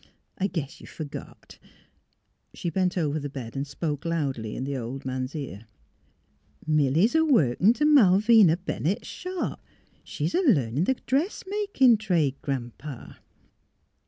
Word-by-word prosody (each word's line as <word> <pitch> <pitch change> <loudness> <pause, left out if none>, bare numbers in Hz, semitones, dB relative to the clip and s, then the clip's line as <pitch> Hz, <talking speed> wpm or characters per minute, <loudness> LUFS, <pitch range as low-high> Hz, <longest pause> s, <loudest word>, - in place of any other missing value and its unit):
I 195 - +1
guess 160 -7 -5
you - - -11
f - - -16
ergot 150 -3 -9 0.5
" - - -47
She 170 - -3
bent 185 0 0
over 155 -3 0
the 145 0 -5
bed 130 -4 -8
and 135 +1 -3
spoke 150 -1 -4
loudly 140 -10 -2
in - - -4
the 140 +1 -3
old 130 +2 -5
man's 130 +2 -4
ear: 115 -8 -7 0.5
*' - - -30
Milly 155 +2 +3
's 235 - 0
a 320 0 +4
workin' 210 - +4
t' 300 +4 0
Malvina 215 - +6
Bennett's 175 - -3
shop. 365 -1 -5 0.4
She's - - -3
a 360 - +2
learnin' 150 - +2
th' 265 - -1
dressmakin' 345 - +2
trade, 165 -10 +1
Gran 130 -4 -3
'pa! 140 -3 -9
160 Hz, 155 wpm, -26 LUFS, 135-220 Hz, 0.5 s, Malvina